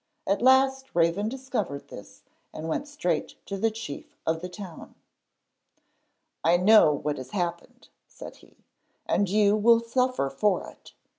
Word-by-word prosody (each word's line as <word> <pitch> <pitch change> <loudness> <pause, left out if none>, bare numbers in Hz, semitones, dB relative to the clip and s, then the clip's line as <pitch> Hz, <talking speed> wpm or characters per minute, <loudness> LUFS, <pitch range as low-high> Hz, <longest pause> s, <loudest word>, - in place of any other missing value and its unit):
At 200 +2 0
last 265 +1 +3
Raven 170 +5 +2
discovered 245 - -4
this - - -12 0.3
and 155 - -7
went 220 - -2
straight 295 +1 -2
to 200 - -5
the 225 +4 +1
chief 220 -9 -8
of 160 0 -1
the 180 - -6
town. 185 -3 -10 1.5
'I 170 +2 +4
know 200 -2 +6
what 145 0 -2
has 130 0 -8
happened,' 175 - -5 0.2
said - - -11
he. - - -23 0.4
'And 200 -2 +1
you 205 +1 +3
will 230 +2 +5
suffer 240 - 0
for 190 +5 0
it. - - -19
205 Hz, 145 wpm, -26 LUFS, 170-245 Hz, 1.5 s, know